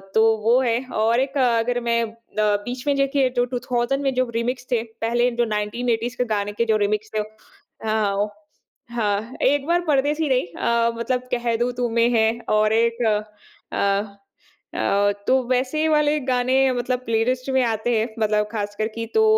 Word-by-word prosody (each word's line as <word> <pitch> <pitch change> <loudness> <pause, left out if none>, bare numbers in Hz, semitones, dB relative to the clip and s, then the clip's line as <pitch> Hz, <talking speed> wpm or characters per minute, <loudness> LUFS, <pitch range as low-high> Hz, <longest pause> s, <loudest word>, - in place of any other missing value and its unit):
तो 220 - +5 0.2
वो 235 +3 +4
है 235 -2 +1 0.2
और 225 +2 +3
एक 270 +2 -1
अगर 245 -1 +2
मैं 235 0 +2
अ, 225 0 -7 0.2
बीच 215 +5 0
में 285 - +3
देखिए 275 -1 +2
जो 245 - +3
2000 245 +2 -1
में 270 - +1
जो 255 0 +1
रीमिक्स 245 +2 -2
थे, 235 -3 +2 0.2
पहले 240 +2 +2
जो 240 0 0
1980s 230 +3 -2
के 250 - +1
गाने 205 0 -1
के 235 +3 0
जो 220 -1 +2
रीमिक्स 210 +1 -1
थे 210 - +1 0.7
आओं 205 -2 +1 0.7
हाँ, 215 +1 -1
एक 285 +2 +2
बार 345 +1 +2
परदेसी 295 +2 +1
नहीं 255 -7 +1
अ, 235 0 +1
मतलब 250 +2 -2
कह 240 -1 0
दूँ 240 +2 0
तुम्हें 235 0 +2
है 220 0 +4 0.2
और 215 0 +3
एक 230 +1 +1 0.7
अ 200 0 0 0.6
अ, 205 +1 +2 0.2
तो 260 0 +4
वैसे 260 +5 +1
वाले 300 -1 +3
गाने 255 0 +1 0.2
मतलब 245 +1 -1
प्लेलिस्ट 245 +3 0
में 260 - +4
आते 225 0 -1
हैं 220 +1 +1
मतलब 210 -1 +1
ख़ासकर 210 0 -2
की 230 - -3
तो 440 - +5
235 Hz, 170 wpm, -22 LUFS, 220-255 Hz, 0.7 s, तो